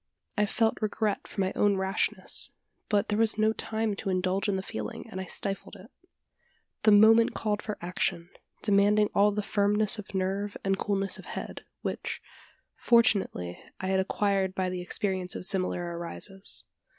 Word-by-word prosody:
I 210 -2 +2
felt 225 +2 +1
regret 215 -1 -1
for 195 - -3
my 190 0 0
own 205 -1 +3
rashness; 190 +1 +1 0.4
but 205 -2 +1
there 210 0 +1
was 225 -1 +2
no 220 0 +3
time 220 -1 -2
to 200 - -3
indulge 185 +2 0
in 200 - +1
the 190 - -2
feeling, 110 - -6
and 190 - -6
I - - -5
stifled 195 +2 -4
it. 225 +8 -14 0.9
The 215 - +5
moment 220 +2 +6
called 210 -1 -1
for 210 - -5
action 175 -1 -2 0.3
demanding 205 0 +4
all 205 +1 +4
the 210 0 -2
firmness 210 +2 +2
of 200 -1 -9
nerve 195 +2 -1
and 195 0 +2
coolness 195 0 +1
of - - -11
head - - -7 0.2
which, - - -3 0.6
fortunately, 200 - +2 0.2
I 190 - -3
had 190 0 +2
acquired 195 0 0
by 185 -1 -1
the 180 -1 -4
experience 185 0 -1
of - - -2
similar 185 -2 +1
arises. 195 +3 -4
200 Hz, 165 wpm, -28 LUFS, 190-210 Hz, 0.9 s, moment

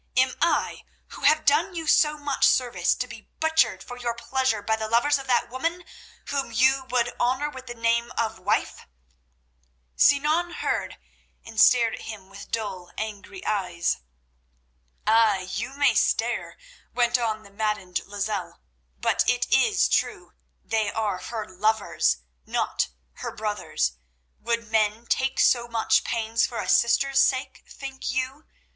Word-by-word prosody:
Am 260 0 +3
I, 340 - +1 0.3
who - - -11
have 310 +1 +4
done 310 +6 +3
you 325 -1 -4
so 300 0 +4
much 290 -2 +2
service, 245 -2 +2
to - - -3
be - - -12
butchered 320 0 +2
for 245 - -9
your 240 -1 -2
pleasure 235 -3 -1
by 220 +1 +1
the 220 0 -4
lovers 275 +6 +3
of 270 - -9
that 250 - +2
woman, 330 +8 -3 0.4
whom 275 -4 -2
you 260 +3 +3
would 245 -1 +1
honour 260 +5 +1
with 260 -2 -10
the 240 - -6
name 230 +1 +1
of 225 -1 -1
wife?" - - -1 1.1
Sinan 310 +5 +3
heard, - - -2 0.5
and 225 -1 0
stared 235 -3 +5
at - - -7
him 200 -4 -9
with 200 0 -11
dull, 190 -5 -4
angry 220 - -6
eyes. 180 - 0 1.1
"Ay, 215 -4 +3
you 270 +2 -4
may 285 -1 +4
stare," - - 0 0.4
went 240 0 +3
on 220 -2 -2
the 200 - -16
maddened 200 -3 -2
Lozelle, 205 -1 -4 0.4
"but - - +1
it - - +1
is - - +4
true—they 65 - -2
are 210 -4 -1
her 220 0 -5
lovers, 185 - 0 0.2
not - - 0 0.3
her - - -5
brothers. 205 - -2 0.4
Would 235 -1 -2
men 215 +1 +1
take 265 +2 0
so 240 -1 +4
much 230 -1 +2
pains 225 -1 0
for 235 - -7
a - - -3
sister's 270 +3 +3
sake, 260 -1 0
think 270 -1 -7
you? 260 +3 -3
235 Hz, 150 wpm, -25 LUFS, 215-265 Hz, 1.1 s, stared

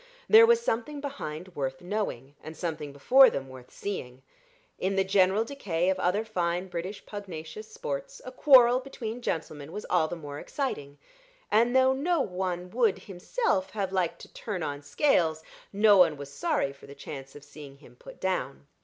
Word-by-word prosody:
There 450 +1 +8
was 470 0 +5
something 290 - -2
behind 185 - -6
worth 135 -2 -3
knowing, 175 - -4
and 155 0 -9
something 155 -4 -4
before 255 - +6
them 135 -1 -4
worth 130 -1 -12
seeing. 130 -10 -6 0.6
In 190 +1 0
the 195 - +3
general 190 +2 +3
decay 185 -10 -1
of 190 - -2
other 185 +5 +1
fine 180 -3 -2
British 180 +4 -6
pugnacious 205 - -8
sports, - - -5
a - - -7
quarrel 255 - +6
between 245 -3 -6
gentlemen 155 -7 -4
was 210 - -6
all 155 - +3
the 175 - -5
more 145 -3 -8
exciting, 145 - -4 0.5
and 235 +4 +3
though 260 0 +5
no 325 +6 0
one 180 -5 -3
would 230 -5 +2
himself 190 - -2
have 200 -3 -2
liked 180 -3 0
to - - -13
turn 195 -7 -4
on 145 -1 -4
Scales, 160 - +1 0.3
no 205 0 +5
one 160 -5 +5
was 140 0 -9
sorry 140 0 -1
for 140 - -16
the 140 - -11
chance 135 -2 -9
of 145 - -11
seeing 145 -2 -12
him 130 -4 -18
put - - -13
down. 145 -8 -2
185 Hz, 175 wpm, -28 LUFS, 150-235 Hz, 0.6 s, There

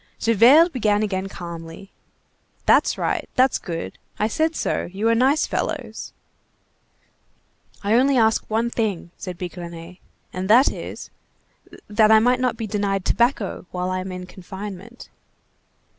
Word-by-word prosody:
Javert 250 - +5
began 215 -4 +1
again 195 -2 -2
calmly:— 170 +1 -9 0.7
"That's - - +4
right, - - -2
that's 260 0 +3
good, 165 -2 -6 0.2
I 215 - +1
said 315 +8 0
so, - - -1
you 200 +4 -1
are - - +4
nice 265 +6 +3
fellows." - - -4 1.7
"I 205 +2 +1
only 265 +3 +4
ask 220 -2 +3
one 230 +2 0
thing," 200 -8 -2
said 180 -2 -7
Bigrenaille, 175 -1 -8 0.4
"and 185 +1 -4
that 245 +5 +6
is, - - -8 0.8
that 215 +1 +4
I 220 - +8
may 245 +3 +3
not 250 -2 -1
be 225 - -4
denied 200 -2 -1
tobacco 235 -7 0
while 180 0 -3
I 185 - -1
am 185 0 -5
in 180 0 -6
confinement." 195 +4 -9
210 Hz, 140 wpm, -22 LUFS, 185-235 Hz, 1.7 s, I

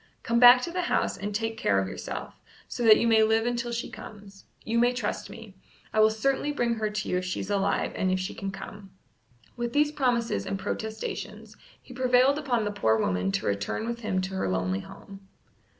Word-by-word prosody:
Come 235 0 +1
back 245 +1 +9
to 340 - -3
the 360 +1 -1
house 355 - 0
and 205 - -4
take 225 +1 -3
care 100 - +2
of 95 0 0
yourself, - - -6 0.3
so - - -6
that 215 -1 +8
you - - +1
may 225 -1 +5
live 220 +1 +3
until 240 0 -2
she 235 0 -3
comes. 200 -2 -12 0.2
You 230 +1 +1
may 245 +1 +3
trust 245 -4 -3
me. 225 -3 -11 0.4
I 220 - +1
will 215 0 +6
certainly 270 +6 0
bring 240 -5 0
her 220 -2 -2
to 210 0 -4
you 180 - 0
if 185 - -6
she's 185 +2 -4
alive 200 -1 0
and 185 - -1
if 185 0 +1
she 185 - -4
can 195 - -5
come." 195 +1 -9 0.7
With 240 0 -3
these 295 0 +3
promises 245 -5 0
and 195 - -2
protestations 220 +2 -5 0.2
he 255 - -14
prevailed 255 +3 +3
upon 245 -7 0
the 205 - -1
poor 110 - +2
woman 95 -2 0
to - - -1
return 100 - -2
with 235 0 -4
him 210 -5 -1
to 190 +1 -5
her 190 - -1
lonely 95 0 -1
home. 195 - -12
220 Hz, 215 wpm, -27 LUFS, 195-240 Hz, 0.7 s, back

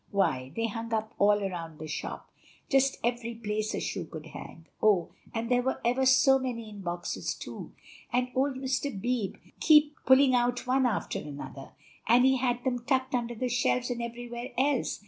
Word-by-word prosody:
Why, 145 -10 0
they 230 - 0
hung 230 +1 -4
up 220 +1 -3
all 205 0 +4
around 170 -4 -5
the 155 - -7
shop, 150 - -6 0.4
just 270 0 +3
every 235 0 -1
place 215 -1 -2
a - - -2
shoe 175 - -3
could 160 -1 -9
hang. 165 +1 -10 0.2
Oh! 200 -6 +3 0.2
and 230 0 -3
there 245 +1 +3
were 265 +1 -1
ever 255 +2 +2
so 270 +1 +6
many 230 -4 -4
in 205 -1 -9
boxes 175 -1 -3
too; - - -8 0.4
and 250 0 0
old 270 +1 +1
Mr. 260 -3 -2
Beebe 240 -2 -1 0.2
keep 300 -2 +6
pulling 265 0 +6
out 245 0 +1
one 260 0 +3
after 225 - -2
another, 140 -1 -8 0.3
and 240 +3 +6
he 265 0 +4
had 245 -1 0
them 245 -2 -1
tucked 260 +1 0
under 240 -1 -1
the 250 +3 -1
shelves 245 +1 +1
and 240 -1 -3
everywhere 240 +1 -6
else. 270 0 +1
240 Hz, 185 wpm, -29 LUFS, 210-260 Hz, 0.4 s, so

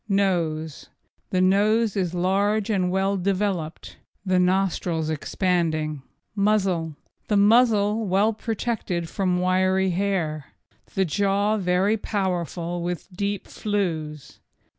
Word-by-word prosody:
NOSE 165 -6 -1 0.4
The 185 - +1
nose 210 +3 +3
is 180 -3 -1
large 200 +4 +1
and 185 -3 +1
well 195 +2 +1
developed, 190 -4 -2 0.3
the 185 -1 +2
nostrils 180 -3 0
expanding. 155 -2 -1 0.3
MUZZLE 190 -6 +1 0.3
The 210 - +2
muzzle 215 0 +4
well 200 +4 +2
protected 215 -6 -3
from 180 0 0
wiry 185 +1 +2
hair. 175 -6 -2 0.4
The 190 - +2
jaw 200 +4 +1
very 190 +3 +1
powerful 175 -4 -2
with 175 +2 -5
deep 200 0 -3
flews. 160 -8 -3
190 Hz, 105 wpm, -24 LUFS, 175-200 Hz, 0.4 s, muzzle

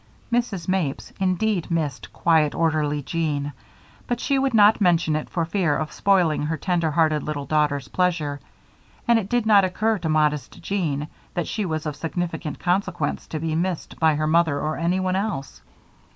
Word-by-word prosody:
Mrs. 225 -8 -1
Mapes, 185 -7 -1
indeed, 190 0 0
missed 155 -6 -2
quiet, 160 -3 +2
orderly 155 -3 0
Jean; 145 -1 -2 0.5
but 245 -1 -1
she 275 +1 +1
would 265 -3 +1
not 210 0 +6
mention 170 -4 +3
it 155 - -3
for 170 -2 -1
fear 165 -4 +1
of 155 -1 -3
spoiling 180 -6 +2
her 155 +2 -1
tender 175 -3 0
hearted 155 -1 +2
little 145 -1 -4
daughter's 145 -1 0
pleasure, 165 -6 0 0.7
and 235 -1 +5
it 200 -3 -6
did 245 -2 +1
not 205 -2 +6
occur 215 +3 0
to 165 -2 -3
modest 150 -3 0
Jean 155 -7 -2 0.3
that 175 - -1
she 210 -3 -2
was 155 -1 -3
of 150 -2 -3
sufficient 165 -1 -4
consequence 175 -5 -1
to 155 - -4
be 160 0 -2
missed 175 +1 -2
by 160 -2 +4
her 155 +1 0
mother 160 -2 +2
or 155 +1 -2
anyone 185 +2 0
else. 190 - -3
165 Hz, 170 wpm, -23 LUFS, 150-190 Hz, 0.7 s, not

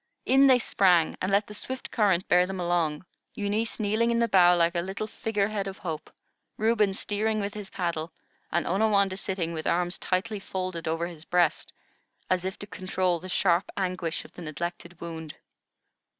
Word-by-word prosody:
In 270 +1 +6
they 260 -2 +7
sprang, 180 -8 +3
and 185 - 0
let 200 +1 +3
the 210 - -10
swift 260 +5 -5
current 195 -5 +2
bear 180 0 +4
them 190 0 -5
along, 170 -2 0 0.3
Eunice 210 +3 -1
kneeling 215 +2 +1
in 235 - +2
the 235 0 +3
bow 180 -4 +6
like 170 -1 +3
a 170 - 0
little 190 +4 -4
figure 210 -1 -1
head 205 -2 -2
of 195 - -6
Hope, 160 -4 -5 0.5
Reuben 215 -3 +2
steering 215 +1 -1
with 200 0 -3
his 210 -2 -7
paddle, 170 -4 -3 0.4
and 170 - +1
Onawandah 200 0 +2
sitting 180 -4 -2
with 160 -1 -4
arms 175 +1 +1
tightly 205 +3 -1
folded 185 -3 -4
over 165 +1 0
his 170 -3 -8
breast, 175 -2 +1 0.6
as 185 0 +1
if 190 - -3
to - - -8
control 185 -3 -1
the 185 - -9
sharp 180 0 +2
anguish 180 -3 -2
of - - -14
the - - -10
neglected 170 +2 -5
wound. 160 -2 -7
185 Hz, 180 wpm, -27 LUFS, 170-205 Hz, 0.6 s, they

